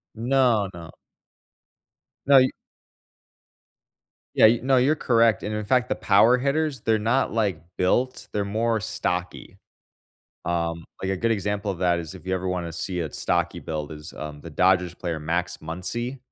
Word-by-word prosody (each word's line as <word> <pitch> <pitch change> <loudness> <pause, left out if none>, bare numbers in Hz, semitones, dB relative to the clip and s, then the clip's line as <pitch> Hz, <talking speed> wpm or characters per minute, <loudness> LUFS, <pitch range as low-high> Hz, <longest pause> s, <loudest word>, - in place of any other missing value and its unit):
No, 120 -3 +2
no. 85 -1 -10 1.4
No, 140 -1 +8
y 130 0 +3 1.8
Yeah, - - +7
y 115 +1 +3
no, 130 0 +3
you're 135 +5 +3
correct 115 -6 +3
and 105 - -3
in 105 0 -2
fact, 125 +2 +2
the - - +1
power 115 +5 +4
hitters, 140 -1 -1
they're 110 -1 +2
not, 120 +4 +1
like, 100 -8 0 0.2
built, 125 +8 0
they're 100 -1 -1
more 110 +2 0
stocky. 90 -2 -4 0.9
Um, 85 -1 -2 0.2
like, 95 - -1
a 95 - 0
good 115 +5 0
example 105 0 -1
of 95 - -5
that 90 -1 +2
is 80 -3 -7
if - - -13
you 95 - 0
ever 95 0 -3
wanna 90 -2 -3
see 90 +2 -3
a 80 -3 -3
stocky 85 0 -1
build 75 -3 -5
is, 75 0 -10
um, 75 -1 -7
the 85 - -9
Dodgers 90 +2 +2
player 85 -3 -4
Max 85 +3 -2
Muncy. 115 +11 -5
100 Hz, 165 wpm, -24 LUFS, 85-115 Hz, 1.8 s, No